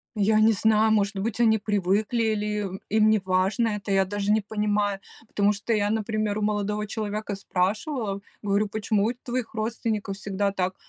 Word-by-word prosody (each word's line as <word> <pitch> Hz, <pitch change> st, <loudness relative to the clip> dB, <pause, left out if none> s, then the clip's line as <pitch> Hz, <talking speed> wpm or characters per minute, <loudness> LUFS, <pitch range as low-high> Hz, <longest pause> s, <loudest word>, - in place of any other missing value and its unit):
Я 215 Hz, +1 st, +3 dB
не 220 Hz, +1 st, +6 dB
знаю, 220 Hz, +1 st, +3 dB
может 210 Hz, -1 st, +2 dB
быть, 205 Hz, +4 st, -3 dB
они 220 Hz, -2 st, +4 dB
привыкли 205 Hz, +2 st, 0 dB
или 215 Hz, -2 st, 0 dB, 0.2 s
им 190 Hz, 0 st, -6 dB
им 215 Hz, +1 st, +4 dB
неважно 195 Hz, +2 st, +2 dB
это, 210 Hz, -1 st, -4 dB
я 195 Hz, 0 st, +4 dB
даже 205 Hz, +1 st, -1 dB
не 215 Hz, +1 st, +3 dB
понимаю, 210 Hz, -1 st, -1 dB, 0.3 s
потому 205 Hz, -1 st, +2 dB
что 205 Hz, +3 st, -4 dB
я, 205 Hz, -1 st, +1 dB
например, 215 Hz, -1 st, -1 dB
у -, -, -2 dB
молодого 210 Hz, 0 st, -1 dB
человека 210 Hz, 0 st, -4 dB
спрашивала, 200 Hz, -, -1 dB, 0.2 s
говорю: 205 Hz, +1 st, +1 dB
"Почему 210 Hz, 0 st, 0 dB
у 230 Hz, -, 0 dB
твоих 245 Hz, -1 st, -5 dB
родственников 215 Hz, -2 st, -2 dB
всегда 200 Hz, 0 st, -1 dB
так?" 185 Hz, -1 st, -2 dB
210 Hz, 170 wpm, -25 LUFS, 200-220 Hz, 0.3 s, не